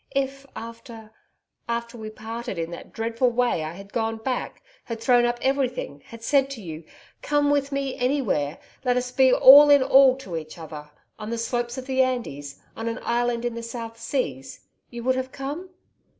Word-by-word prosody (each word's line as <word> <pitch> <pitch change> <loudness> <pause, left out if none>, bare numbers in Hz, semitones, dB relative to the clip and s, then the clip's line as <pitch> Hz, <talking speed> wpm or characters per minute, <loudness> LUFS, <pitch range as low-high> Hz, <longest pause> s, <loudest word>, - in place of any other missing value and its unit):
If 275 0 -2
after 230 -1 -9 0.6
after 235 +1 -3
we 220 -2 -7
parted 225 0 -6
in 165 0 -3
that 170 - -9
dreadful 230 +2 0
way, 240 -8 +1
I 155 +1 -5
had 195 +2 -12
gone 225 -1 -1
back, 250 +3 -4 0.2
had 230 -1 -5
thrown 245 0 +4
up 240 0 0
everything, 255 - -1
had 230 -1 -11
said 275 +1 +3
to 270 -5 -7
you, 160 -1 -7 0.4
"Come 290 -1 +2
with 285 -1 +1
me 275 -1 -2
ANYWHERE, 245 - 0 0.3
let 250 -1 +2
us 250 0 -2
be 260 0 +5
all 285 +4 +9
in 285 -2 +7
all 265 0 +6
to 190 -10 -7
each 155 0 -8
other 150 -2 -9 0.3
on 215 0 -6
the 235 - -2
slopes 240 +1 -2
of 260 - -5
the 265 -1 +2
Andes, 145 - -2 0.2
on 225 - -5
an 230 +1 -2
island 240 0 0
in 240 - -1
the 235 - -5
South 230 -1 -7
Seas 150 - -3 0.3
you 235 -1 -7
would 260 +1 +2
have 260 0 -3
come?"' 290 +7 -6
240 Hz, 190 wpm, -25 LUFS, 225-260 Hz, 0.6 s, all